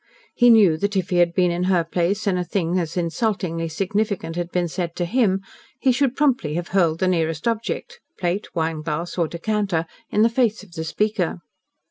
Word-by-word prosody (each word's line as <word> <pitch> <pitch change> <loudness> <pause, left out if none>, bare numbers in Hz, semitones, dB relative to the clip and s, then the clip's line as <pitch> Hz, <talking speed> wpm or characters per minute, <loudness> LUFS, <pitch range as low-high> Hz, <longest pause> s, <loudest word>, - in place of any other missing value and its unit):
He 245 - +5
knew 205 -9 +6
that 200 +3 -1
if 185 -1 -2
he 180 - +2
had 170 -1 +3
been 180 -1 +3
in 175 +1 -1
her 180 -2 +3
place 180 +5 -1
and 185 -3 +1
a - - 0
thing 180 -1 -1
as 170 0 -3
insultingly 170 -2 -1
significant 195 0 -2
had 175 0 -3
been 180 -1 0
said 170 0 -4
to 175 - -1
him, 195 -1 +2 0.4
he 265 - +3
should 265 0 +1
promptly 250 - +1
have 175 0 -3
hurled 170 -3 +2
the 185 - +3
nearest 165 -1 0
object 230 -1 -3 0.2
plate, 180 +3 -1
wineglass, 160 0 -2
or 170 - +2
decanter 185 -1 -1 0.2
in 210 - +3
the - - +6
face 230 -3 +1
of 200 - -16
the 160 -1 -5
speaker. 190 -2 -1
180 Hz, 195 wpm, -22 LUFS, 170-210 Hz, 0.4 s, knew